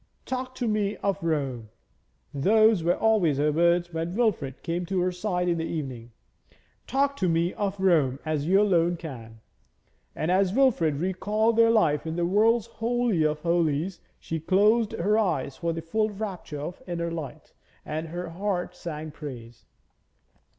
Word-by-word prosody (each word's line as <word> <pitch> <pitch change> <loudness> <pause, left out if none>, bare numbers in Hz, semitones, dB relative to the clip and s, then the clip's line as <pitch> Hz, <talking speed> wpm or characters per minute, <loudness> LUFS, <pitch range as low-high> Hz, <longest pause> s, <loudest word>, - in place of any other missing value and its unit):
'Talk 255 0 -4
to 245 -2 -2
me 210 -1 0
of 200 -1 0
Rome;' 135 -9 -2 0.6
those 215 +6 +4
were 175 +2 +2
always 205 -10 +2
her 150 +1 +2
words 170 +2 +2
when 165 +2 -3
Wilfrid 175 - -1
came 175 +1 -2
to 190 0 0
her 180 +1 +1
side 180 -1 -2
in 170 -1 +1
the - - -1
evening. 130 -8 -5 0.8
'Talk 280 +2 +1
to 185 - +1
me 165 +2 +1
of 200 -1 -3
Rome, 155 -9 +3
as 155 -1 -1
you 190 +3 +5
alone 175 -4 +2
can.' 115 -9 -9 0.7
And 160 - -1
as 190 +1 +2
Wilfrid 215 - +3
recalled 205 +7 0
their 230 0 +5
life 165 -9 +2
in 160 - -3
the 175 0 0
world's 215 +4 +3
holy 230 -4 0
of 155 0 +1
holies, 170 +1 0 0.2
she 165 - -4
closed 210 +7 +3
her 210 +5 +1
eyes 140 -10 -1
for 170 +3 -1
the 165 0 -5
full 215 +6 0
rapture 195 -7 -6
of 170 +4 -6
the 175 - -7
inner 170 0 -2
light, 160 -5 -7 0.3
and 155 +2 -4
her 175 +1 -5
heart 180 0 -3
sang 155 -3 -6
praise. 125 -6 -9
175 Hz, 165 wpm, -26 LUFS, 155-210 Hz, 0.8 s, you